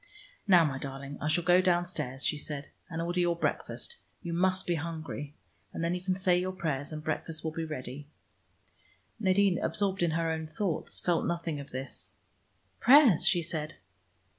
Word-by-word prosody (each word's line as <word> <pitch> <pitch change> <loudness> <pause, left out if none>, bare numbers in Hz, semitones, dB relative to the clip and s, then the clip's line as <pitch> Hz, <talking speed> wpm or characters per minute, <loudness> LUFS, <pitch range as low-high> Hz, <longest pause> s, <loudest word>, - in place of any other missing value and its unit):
"Now, 175 -4 +7
my 135 -3 -2
darling, 140 +1 -6
I 150 - -1
shall 155 +3 +2
go 180 +2 +5
downstairs," 175 -7 0
she 150 - 0
said, 145 -1 -5 0.2
"and 165 -2 -4
order 175 +1 -1
your 175 -1 +2
breakfast. 475 - -3 0.3
You 170 - -3
must 185 +2 +2
be 175 - +1
hungry. 160 -2 -5 0.4
And - - -3
then 170 +1 +1
you 180 - -3
can 185 0 0
say 180 -1 +3
your 185 +1 -2
prayers, 150 -6 -2
and 155 0 -6
breakfast 155 +1 -2
will 160 - -2
be 165 +1 -3
ready." 145 -2 -6 1.1
Nadine, 195 -2 +3
absorbed 195 +2 0
in 170 - +3
her 165 -1 0
own 160 0 -3
thoughts, 165 +1 -2
felt 175 -2 +1
nothing 170 -3 -2
of 140 - -8
this. 130 +1 -5 0.6
"Prayers?" 255 - +7
she 175 - +3
said. 155 -2 -3
165 Hz, 175 wpm, -30 LUFS, 150-180 Hz, 1.1 s, Now